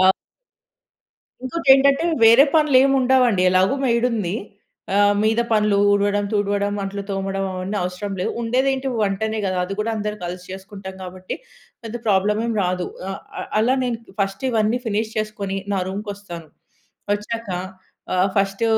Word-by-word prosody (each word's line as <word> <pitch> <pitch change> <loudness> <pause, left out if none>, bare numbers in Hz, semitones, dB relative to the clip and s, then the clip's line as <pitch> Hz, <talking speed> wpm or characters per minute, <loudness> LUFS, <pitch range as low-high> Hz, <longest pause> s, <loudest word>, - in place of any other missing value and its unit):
ఆ 185 - +6 1.4
ఇంకోటేంటంటే 275 +1 +4 0.2
వేరే 230 +4 +8
పనులేమి 275 -3 +5
ఉండవండి 250 -6 +3
ఎలాగో 185 +7 +3
మెయిడ్ 235 -1 +2
ఉంది. 205 -5 -1 0.6
ఆహ్, 205 0 +5
మీద 220 +2 +2
పనులు 210 -2 +3
ఊడవడం, 205 0 +2
తుడవడం, 205 0 0
అంట్లు 200 +1 -4
తోమడం 195 0 -2
అవన్నీ 185 +3 -3
అవసరం 180 +3 -4
లేదు. 180 - -1
ఉండేది 250 +4 +1
ఏంటి 270 0 -3
వంటనే 215 +2 -1
కదా! 185 -1 -1
అది 195 - -5
కూడా 215 +2 0
అందరం 210 0 -3
కలిసి 180 +1 -6
చేసుకుంటాం 190 0 -8
కాబట్టి 185 0 -6 0.5
పెద్ద 225 0 -6
ప్రాబ్లమ్ 210 +1 +2
ఏమి 230 -1 -1
రాదు. 180 0 -1 0.2
ఆహ్, 195 - -5 0.2
ఆహ్, - - -6
అలా 240 +4 +3
నేను 245 -2 -1 0.2
ఫస్ట్ 195 +4 -3
ఇవన్నీ 225 0 +1
ఫినిష్ 220 0 -1
చేసుకొని 205 -2 -3 0.2
నా 195 - +1
రూమ్‌కి 205 +2 -5
వస్తాను. 175 -5 -10 0.7
వచ్చాక 220 +2 -4 0.7
ఆహ్, 185 +2 +3
ఫస్ట్ 195 +2 0
205 Hz, 145 wpm, -21 LUFS, 195-230 Hz, 1.4 s, వేరే